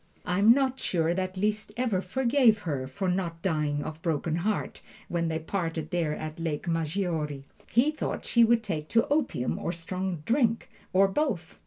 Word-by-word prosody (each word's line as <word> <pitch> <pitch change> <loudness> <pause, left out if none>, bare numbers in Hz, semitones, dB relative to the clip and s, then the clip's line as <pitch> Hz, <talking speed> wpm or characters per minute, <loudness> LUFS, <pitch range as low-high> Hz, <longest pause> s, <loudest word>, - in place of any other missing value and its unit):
I 180 +1 0
am 210 +3 +7
not 265 +1 +2
sure 165 -1 +1
that 185 +1 -3
Liszt 210 +2 -1
ever 240 -6 +1
quite 185 - -8
forgave 250 -2 +4
her 140 -8 -3
for 140 +9 -3
not 180 -2 -1
dying 150 -5 0
of 155 0 -7
broken 160 0 -1
heart, 205 +4 -2 0.3
when 170 -1 0
they 160 -1 -1
parted 165 -2 -3
there 165 -4 0
at 155 +1 -6
Lake 165 +1 -3
Maggiore. 160 -3 -1 0.3
He 260 +6 +3
thought 310 - -4
she 235 - +5
would 230 0 +4
take 155 -8 -3
to 230 +5 +2
opium 285 - 0
or - - -2
strong 180 0 -4
drink, 230 -1 +1 0.2
or 195 +1 +5
both. 195 - -2
180 Hz, 180 wpm, -28 LUFS, 160-220 Hz, 0.3 s, am